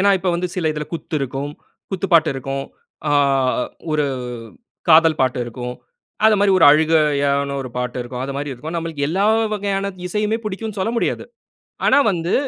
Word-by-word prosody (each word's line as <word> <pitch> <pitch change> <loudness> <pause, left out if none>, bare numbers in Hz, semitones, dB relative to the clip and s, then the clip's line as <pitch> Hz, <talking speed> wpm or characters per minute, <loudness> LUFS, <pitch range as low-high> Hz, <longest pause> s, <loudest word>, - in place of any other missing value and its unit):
ஏனா, 200 +1 +4
இப்ப 185 0 -2
வந்து 180 +1 -1
சில 170 -4 0
இதுல 150 0 -4
குத்து 165 -1 -4
இருக்கும், 135 +2 -3 0.4
குத்து 190 0 -2
பாட்டு 160 -1 +5
இருக்கும். 135 +1 -4 0.4
ஆ - - +1 0.8
1 150 -1 +1 0.8
காதல் 160 -1 +6
பாட்டு 130 -1 +1
இருக்கும். 125 +1 -6 0.5
அது 220 -1 +6
மாரி 205 - +4
1 - - +6
அழுகையான 145 -3 +2
1 130 - -6
பாட்டு 125 0 -3
இருக்கும். 125 +1 -6
அது 140 - -4
மாரி 145 0 -3
இருக்கும். 155 +7 -7
நம்ளுக்கு 160 -4 -2
எல்லா 190 +5 +1 0.3
வகையான 200 -1 -1 0.2
இசையுமே 210 +4 -1
பிடிக்கும்னு 215 0 -5
சொல்ல 205 +4 0
முடியாது. - - -1 0.6
ஆனா - - +5
வந்து 170 -1 -2
160 Hz, 165 wpm, -20 LUFS, 140-190 Hz, 0.8 s, காதல்